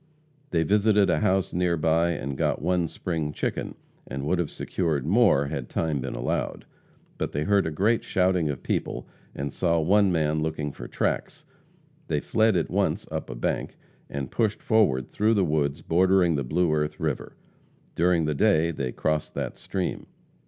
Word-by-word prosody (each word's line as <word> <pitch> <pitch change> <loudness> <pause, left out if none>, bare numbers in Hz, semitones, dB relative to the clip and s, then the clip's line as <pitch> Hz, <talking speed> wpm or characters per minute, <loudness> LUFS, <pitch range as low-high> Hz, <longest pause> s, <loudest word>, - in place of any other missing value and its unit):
They 80 -2 +1
visited 105 +1 +3
a - - +2
house 95 -3 +1
near 90 -1 +1
by 80 +2 +2
and 70 -3 -4
got - - 0
one 90 +1 +1
spring 80 -3 -3
chicken, - - -3 0.3
and 70 +2 -5
would 90 +4 +1
have 85 - -1
secured 80 -7 -2
more 95 - +4
had 70 - -4
time 80 -4 -1
been 65 - -4
allowed. - - -2 0.5
But - - -2
they 75 - -1
heard 100 0 +2
a - - 0
great 105 +9 +1
shouting 90 -4 +1
of 70 -3 -4
people, - - -2 0.3
and 70 0 -4
saw 85 -2 +1
one 100 +4 +4
man 80 -2 +1
looking 75 -2 -2
for - - -9
tracks. - - -2 0.6
They 75 - 0
fled 110 +6 +2
at 85 - 0
once - - 0
up - - -4
a 65 - -5
bank, - - -2 0.3
and 70 -2 -5
pushed 110 -3 0
forward 85 - +2
through 110 +2 +2
the 100 -3 +3
woods 75 -2 0
bordering 90 0 +3
the 70 - -1
Blue 85 +6 +1
Earth 75 0 -1
river. 75 -5 -3 0.6
During 85 -1 +2
the 75 - 0
day 85 -1 +3
they 70 -5 -3
crossed 75 +3 -2
that - - -3
stream. 95 -2 -4
80 Hz, 175 wpm, -26 LUFS, 75-95 Hz, 0.6 s, more